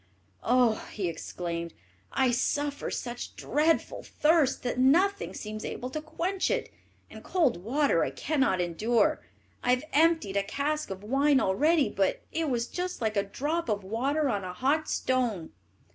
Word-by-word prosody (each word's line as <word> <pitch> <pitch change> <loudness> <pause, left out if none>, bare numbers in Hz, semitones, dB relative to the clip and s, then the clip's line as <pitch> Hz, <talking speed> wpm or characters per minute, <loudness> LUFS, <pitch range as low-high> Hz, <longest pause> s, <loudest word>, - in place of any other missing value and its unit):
"Oh," 245 -2 +3
he 195 -4 -2
exclaimed, 170 0 -5 0.4
"I 260 -2 +2
suffer 285 +4 -1
such 240 -1 -5
dreadful 310 +3 0
thirst 305 -3 +2
that 245 0 -2
nothing 370 - +3
seems 215 0 -6
able 250 +1 -5
to 310 - -3
quench 355 +5 -2
it; - - -2 0.4
and - - -11
cold 275 - +1
water 270 - +2
I - - 0
cannot 270 -11 0
endure. 210 +6 +1 0.4
I - - -1
have 250 +2 +3
emptied 315 -10 +3
a 200 - +2
cask 300 +8 -2
of 195 0 -7
wine 275 +5 +3
already, 295 - +3
but - - 0
it 325 -2 -1
was 235 -2 0
just 360 +6 -4
like 220 -2 -1
a 200 - +3
drop 290 +10 -2
of 205 -2 -1
water 270 +9 0
on 205 -6 -1
a 180 -1 -5
hot 285 +9 0
stone." 240 -10 -1
255 Hz, 160 wpm, -28 LUFS, 210-305 Hz, 0.4 s, Oh